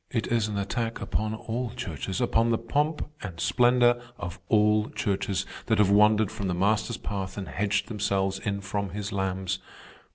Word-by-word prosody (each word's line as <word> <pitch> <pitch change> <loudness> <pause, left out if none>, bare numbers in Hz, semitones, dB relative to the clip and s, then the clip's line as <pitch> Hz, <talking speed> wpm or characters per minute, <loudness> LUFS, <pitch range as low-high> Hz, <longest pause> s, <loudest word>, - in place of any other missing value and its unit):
It 115 -2 -1
is 115 -2 +2
an 105 -1 -3
attack 115 +3 -2
upon 110 +1 -1
all 115 +2 -3
churches, 95 - -4
upon 115 -2 +2
the 115 - +3
pomp 145 +7 0
and 90 -5 -7
splendor 120 +1 +4 0.2
of 90 -2 -6
all 105 0 +4
churches 100 -5 -1 0.2
that - - +3
have 100 -2 +4
wandered 105 0 +5
from 105 -3 -4
the 90 - 0
Master's 105 +5 +1
path 95 -1 -4
and 100 - -4
hedged 100 +1 0
themselves 100 -3 0
in 100 -1 -2
from 100 0 -2
his 105 0 -4
lambs. 95 -1 -1
105 Hz, 170 wpm, -27 LUFS, 95-115 Hz, 0.2 s, wandered